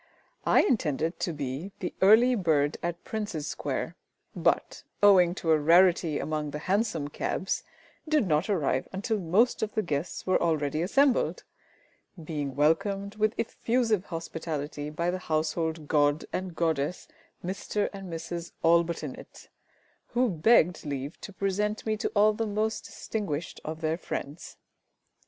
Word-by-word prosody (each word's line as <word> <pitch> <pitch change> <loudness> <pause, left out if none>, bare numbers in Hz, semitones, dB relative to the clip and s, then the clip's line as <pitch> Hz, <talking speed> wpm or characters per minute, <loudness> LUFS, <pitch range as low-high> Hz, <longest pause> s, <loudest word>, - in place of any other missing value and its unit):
I - - +6
intended 165 - 0
to 175 - -1
be 145 +5 -5
the 180 - -4
early 220 +6 +7
bird 155 -9 +2
at 170 0 -4
Prince's 205 -9 -4
Square, - - -3 0.4
but, - - 0 0.2
owing 185 -4 +6
to 165 -4 0
a 155 - +5
rarity 170 0 +4
among 155 -1 -2
the 150 - -5
hansom 185 -3 0
cabs, 190 +5 -2 0.5
did 305 -7 +3
not 155 +4 +1
arrive 145 -9 0
until 205 +3 -1
most 195 +8 +2
of 220 -1 -2
the 215 - +1
guests 150 0 -3
were 185 - +2
already 155 -2 0
assembled, 270 +9 +2 0.8
being 145 -4 -4
welcomed 195 +7 +1
with 215 +2 +1
effusive 225 -4 0
hospitality 155 -3 -5
by 170 +3 -1
the 185 - -3
household 160 -1 -1
god 145 0 +2
and 185 -2 -3
goddess, 160 0 -1 0.4
Mr 195 +2 -1
and 195 -2 -8
Mrs 170 +1 -5
ALLBUTT 170 0 +3
INNETT, - - -9 0.7
who 250 0 +3
begged 180 -1 +3
leave 140 0 -5
to - - -8
present 200 +2 -1
to - - -10
me 215 - +1 0.2
all 210 +1 +5
the 225 +1 -2
most 215 +1 -1
distinguished 175 -7 -4
of 155 +1 -6
their 160 +1 0
friends. 145 -1 -6
170 Hz, 140 wpm, -28 LUFS, 155-205 Hz, 0.8 s, early